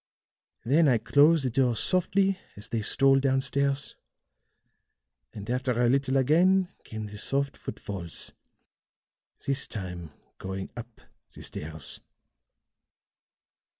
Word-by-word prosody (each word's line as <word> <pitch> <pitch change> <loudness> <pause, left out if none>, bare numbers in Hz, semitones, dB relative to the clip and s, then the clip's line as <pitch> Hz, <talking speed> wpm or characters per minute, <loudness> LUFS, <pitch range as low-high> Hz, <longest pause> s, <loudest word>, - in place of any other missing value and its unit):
"Then 150 +6 +4
I 125 -4 +4
closed 145 +6 +4
the 130 - 0
door 125 -1 +2
softly, 190 - +2 0.2
as 105 +2 -7
they 115 -1 -1
stole 135 +5 +4
down 135 -1 +2
stairs; 140 +1 0 1.4
and 105 -2 -9
after 125 +1 0
a 120 - +4
little 135 +1 +2
again 175 +7 +4
came 110 -1 -6
the 105 0 -9
soft 140 +4 -1
footfalls, 85 -6 -4 1.1
this 140 0 +1
time 90 -5 -6 0.3
going 95 0 -5
up 120 -1 -10 0.3
the - - -10
stairs." 80 -1 -5
130 Hz, 115 wpm, -27 LUFS, 105-140 Hz, 1.4 s, Then